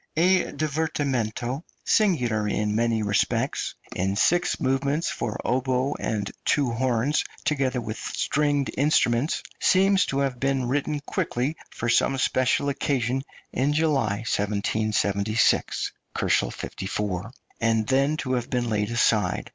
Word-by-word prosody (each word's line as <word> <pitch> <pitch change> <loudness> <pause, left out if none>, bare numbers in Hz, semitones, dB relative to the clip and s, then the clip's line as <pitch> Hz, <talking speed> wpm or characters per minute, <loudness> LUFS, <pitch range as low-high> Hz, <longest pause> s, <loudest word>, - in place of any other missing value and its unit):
A 180 +2 +4
divertimento, 140 -5 -1 0.2
singular 125 - +2
in 105 0 0
many 115 -1 +1
respects, 100 -1 0 0.2
in 95 +2 0
six 175 - +2
movements, 140 +4 0
for 120 -3 -3
oboes 130 +2 +1
and 105 -2 -2
two 140 -5 +2
horns, 125 +4 +1 0.2
together 135 -4 +1
with 110 -2 -5
stringed 145 -1 0
instruments, 140 -1 +2 0.2
seems 195 +1 +4
to 135 - -2
have 135 -3 -1
been 135 -2 0
written 145 +3 -1
quickly 140 +1 -2
for 115 - -4
some 135 +3 +3
special 130 +1 +1
occasion 135 -2 0 0.3
in 135 +4 +1
July, 135 -9 +1
1776 105 +1 +1 0.3
(54 95 +9 -1
K.), 110 - -10 0.3
and 115 -1 +2
then 135 +5 +2
to 130 -3 -2
have 120 -1 -1
been 120 -2 -1
laid 105 0 0
aside. 110 -5 +1
125 Hz, 125 wpm, -25 LUFS, 110-145 Hz, 0.3 s, A